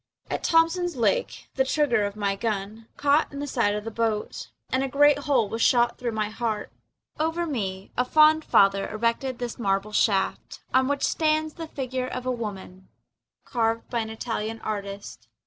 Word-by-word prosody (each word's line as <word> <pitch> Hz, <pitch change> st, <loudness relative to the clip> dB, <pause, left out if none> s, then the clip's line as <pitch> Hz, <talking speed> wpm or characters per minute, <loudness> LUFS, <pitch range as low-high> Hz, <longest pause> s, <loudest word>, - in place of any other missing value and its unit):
At -, -, -2 dB
Thompson's 335 Hz, +1 st, +2 dB
Lake 485 Hz, -, 0 dB
the 265 Hz, -, +2 dB
trigger 265 Hz, -6 st, +2 dB
of 200 Hz, 0 st, -4 dB
my 200 Hz, -2 st, -1 dB
gun 215 Hz, +1 st, -4 dB
Caught 290 Hz, +1 st, +2 dB
in -, -, -6 dB
the 290 Hz, -, -3 dB
side 230 Hz, -7 st, +1 dB
of 210 Hz, -, -4 dB
the 225 Hz, -, -5 dB
boat 220 Hz, -1 st, -2 dB, 0.2 s
And 260 Hz, +1 st, +1 dB
a -, -, 0 dB
great 285 Hz, +1 st, +4 dB
hole 245 Hz, -7 st, +3 dB
was 225 Hz, +3 st, -4 dB
shot 240 Hz, 0 st, +3 dB
through 240 Hz, -2 st, -2 dB
my 215 Hz, -1 st, -1 dB
heart. 215 Hz, -1 st, -3 dB, 0.5 s
Over 325 Hz, +2 st, 0 dB
me 195 Hz, -, -4 dB
a 250 Hz, -, +2 dB
fond 310 Hz, +4 st, +5 dB
father 195 Hz, -5 st, +3 dB
erected 235 Hz, +3 st, -1 dB
this 245 Hz, -1 st, -5 dB
marble 195 Hz, -1 st, 0 dB
shaft, 205 Hz, -2 st, 0 dB
On 260 Hz, 0 st, +4 dB
which 285 Hz, 0 st, -1 dB
stands 310 Hz, -1 st, +1 dB
the 330 Hz, -2 st, -7 dB
figure 260 Hz, -3 st, -3 dB
of 255 Hz, 0 st, -5 dB
a 255 Hz, -, 0 dB
woman 195 Hz, -5 st, -6 dB, 0.6 s
Carved 230 Hz, -1 st, -1 dB
by 240 Hz, -, 0 dB
an 220 Hz, -1 st, -3 dB
Italian 225 Hz, 0 st, -4 dB
artist. 200 Hz, -, -6 dB
235 Hz, 180 wpm, -25 LUFS, 210-280 Hz, 0.6 s, fond